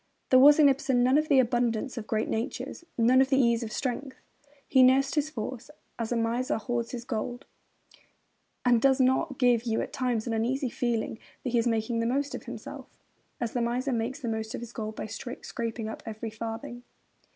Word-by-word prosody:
There 255 - +8
was 290 +2 +8
in 300 -2 +7
Ibsen 265 -2 +2
none 260 +4 +4
of 305 - -1
the 280 - +5
abundance 240 0 +1
of 230 -3 -6
great 220 -1 0
natures, 245 +7 -4
none 250 +3 +5
of 265 - +2
the 270 - +3
ease 235 -3 +3
of 225 -2 -5
strength. 260 +3 -3 0.5
He 265 - +5
nursed 260 +2 +5
his 300 -1 0
force, 245 -1 -6 0.3
as 230 0 -3
a - - +1
miser 230 +3 0
hoards 235 +2 -2
his 240 -2 -6
gold; 245 +1 -4 1.2
and 240 -2 +4
does 265 0 +4
he 260 - +4
not 260 +1 +1
give 245 -3 +4
you 225 -1 0
at - - -4
times 245 -4 -1
an 235 - -2
uneasy 250 +4 0
feeling 230 -2 -2 0.2
that 250 - -2
he 240 - +3
is 230 - +1
making 230 0 0
the 230 - 0
most 280 +3 -1
of - - -6
himself, - - -9 0.4
as 235 -2 -3
the 245 - 0
miser 250 +3 -1
makes 235 +4 -2
the 255 - -5
most 220 0 -3
of - - -6
his 235 0 -8
gold 215 -1 -5
by - - -5
scraping 230 0 -5
up 220 - -6
every 220 0 -5
farthing? 230 +3 -6
240 Hz, 205 wpm, -28 LUFS, 230-260 Hz, 1.2 s, There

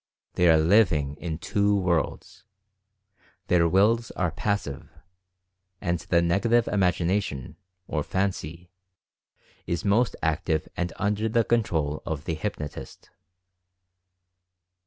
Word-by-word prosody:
They 90 -1 +3
are 80 - +6
living 80 -5 +3
in 80 -2 -4
two 100 +4 +1
worlds. 90 -5 -1 1.1
Their 85 -1 +4
Wills 110 +6 +3
are 90 -3 0
passive 85 -6 -3 0.5
— 90 0 -53
and 85 -2 -1
the 85 0 +1
Negative 115 +7 +2
Imagination, 90 -6 0 0.3
or 75 - -1
Fancy, 90 -1 -3 1.0
is 85 +3 -2
most 110 +4 +2
active 80 0 0
and 90 -1 -2
under 105 +2 -1
the 115 +1 +2
control 80 -11 0
of 75 -2 -5
the 85 - -2
hypnotist. 80 -3 -6
90 Hz, 110 wpm, -26 LUFS, 80-100 Hz, 1.1 s, are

